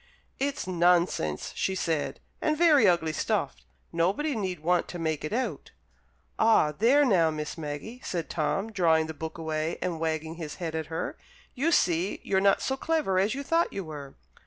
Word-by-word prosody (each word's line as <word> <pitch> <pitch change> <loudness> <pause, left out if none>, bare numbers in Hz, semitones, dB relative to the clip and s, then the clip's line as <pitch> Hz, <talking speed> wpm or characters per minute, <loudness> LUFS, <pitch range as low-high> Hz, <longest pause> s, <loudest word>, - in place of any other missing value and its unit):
"It's 280 +1 -1
nonsense!" 175 - +1
she 190 - -1
said, 155 -6 -1 0.2
"and 305 0 +1
very 300 -9 +6
ugly 165 -3 +2
stuff; - - -1 0.4
nobody 195 - +1
need 190 -6 -3
want 175 +2 +1
to 175 - -6
make 160 -3 -2
it 155 - -4
out." 255 +4 -3 0.7
"Ah, 220 -9 +4
there 240 - +4
now, 180 -9 +4
Miss 150 -1 -4
Maggie!" 160 +11 -6
said 170 -3 -3
Tom, 195 +7 -1
drawing 165 -5 +3
the 160 - -6
book 160 +1 -6
away 160 0 -2
and 175 -3 -2
wagging 160 0 -2
his 155 -4 -6
head 165 -3 -4
at 160 -1 -3
her; 160 0 -4 0.3
"you 295 +6 0
see 175 - +2
you're 190 -1 +1
not 195 0 +3
so 265 - 0
clever 290 -10 0
as 205 +5 +1
you 280 - -4
thought 330 +4 +1
you 195 - -3
were." 145 -4 -9
175 Hz, 180 wpm, -28 LUFS, 160-220 Hz, 0.7 s, very